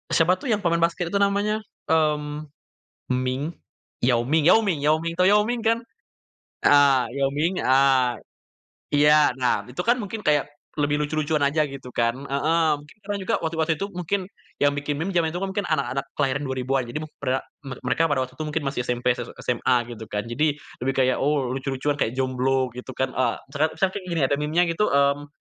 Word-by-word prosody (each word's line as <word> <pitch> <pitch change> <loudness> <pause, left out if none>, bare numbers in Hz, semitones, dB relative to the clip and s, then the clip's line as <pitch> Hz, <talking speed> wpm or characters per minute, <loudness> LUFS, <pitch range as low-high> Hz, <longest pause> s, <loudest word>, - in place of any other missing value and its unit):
siapa 180 +3 +4
tuh 265 - -4
yang 210 -2 +1
pemain 170 0 +2
basket 170 +2 0
itu 200 - +2
namanya, 205 +2 +1 0.3
mmm, 150 -1 0 0.6
Ming? 130 +5 -2 0.5
Yao 120 -2 +2
Ming 155 +3 +2
Yao 225 - +6
Ming 165 -7 0
Yao 150 +2 +3
Ming. 165 0 -3
Tau 185 - +4
Yao 210 +1 +4
Ming 240 +1 -2
kan? 225 0 +2 0.9
Heeh, 140 -2 +6 0.2
Yao 135 0 +2
Ming, 165 +5 0
eee, 130 -1 +4 0.8
iya. 150 +1 +5
Nah 125 -1 0
itu 125 +8 -4
kan 240 +1 +2
mungkin 210 +1 -5
kayak 150 -1 +2 0.3
lebih 145 0 +1
lucu-lucuan 150 0 0
aja 150 +2 +2
gitu 135 -2 -9
kan 115 0 +1
heeh, 145 +4 0
mungkin 145 +1 -17 0.3
juga - - +1
waktu 160 0 -2
waktu 160 +1 +2
itu 200 +4 -4
mungkin 180 +2 -2 0.4
yang 145 0 +4
bikin 145 0 -2
meme 185 +4 -2
zaman 170 -2 +2
itu 175 - -3
mungkin 195 +1 -2
anak-anak 135 -3 -1
kelahiran 135 0 0
2000-an. 130 0 -1
Jadi 135 +6 -4
mukbra 135 -4 -3 0.3
mer 135 - -5
mereka 165 0 +2
pada 140 -3 +1
waktu 130 0 -9
itu 155 - -1
mungkin 150 0 -2
masih 135 -2 -2
SMP, 125 +1 +1
s 120 -1 -6 0.2
SMA 125 +1 +1 0.2
gitu 110 -1 -8
kan. 105 0 -3
Jadi 150 +4 +1 0.3
lebih 135 +1 0
kayak, 130 -1 +2
oh 140 -2 +1
lucu-lucuan 135 +2 -2
kayak 115 - 0
jomblo 130 0 0
gitu 125 +1 -7
kan. 130 0 -1
Eee, 125 -2 0 0.2
teret 155 +2 +1
misalkan 190 -1 0
kayak 185 - -13
gini, 160 - +1
ada 140 - +1
memenya 155 +4 +2
gitu, 190 +6 +1
mmm, 140 +1 +2
145 Hz, 195 wpm, -24 LUFS, 130-165 Hz, 0.9 s, Yao